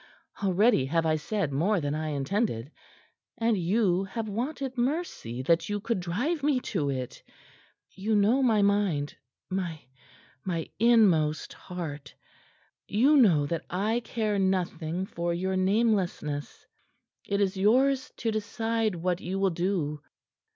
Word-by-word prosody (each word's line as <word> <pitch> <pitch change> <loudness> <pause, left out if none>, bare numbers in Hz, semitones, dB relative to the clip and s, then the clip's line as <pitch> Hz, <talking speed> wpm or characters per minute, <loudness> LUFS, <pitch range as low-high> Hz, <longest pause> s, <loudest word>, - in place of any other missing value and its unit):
Already 195 - +3
have 165 +3 +1
I 155 -1 +3
said 170 +1 -2
more 180 +8 +2
than 145 -2 -2
I 155 +1 -2
intended. 145 - -1 0.7
And 230 -1 +2
you 190 0 +1
have 220 +3 -4
wanted 260 +5 -3
mercy 245 - -2
that 165 +6 +2
you 205 0 -1
could 230 0 -1
drive 245 - -1
me 285 -2 +2
to 150 -7 0
it. 130 -2 -4 0.7
You 215 +3 -1
know 215 +6 +3
my 220 -5 +3
mind 200 -8 +1 0.4
my 180 -4 -2 0.6
my 170 -4 -3
inmost 195 -10 +3
heart. 150 -6 -7 0.7
You 260 +9 +4
know 180 - +5
that 165 +3 -3
I 210 +6 0
care 215 -4 -1
nothing 180 -2 -1
for 170 -2 -2
your 190 +2 -1
namelessness. 185 -7 0 0.6
It 200 - 0
is 200 -1 +1
yours 255 +7 +2
to 230 - -1
decide 225 0 -1
what 175 +1 -1
you 185 +3 -3
will 195 -1 +2
do. 170 -4 -1
190 Hz, 135 wpm, -28 LUFS, 165-225 Hz, 0.7 s, know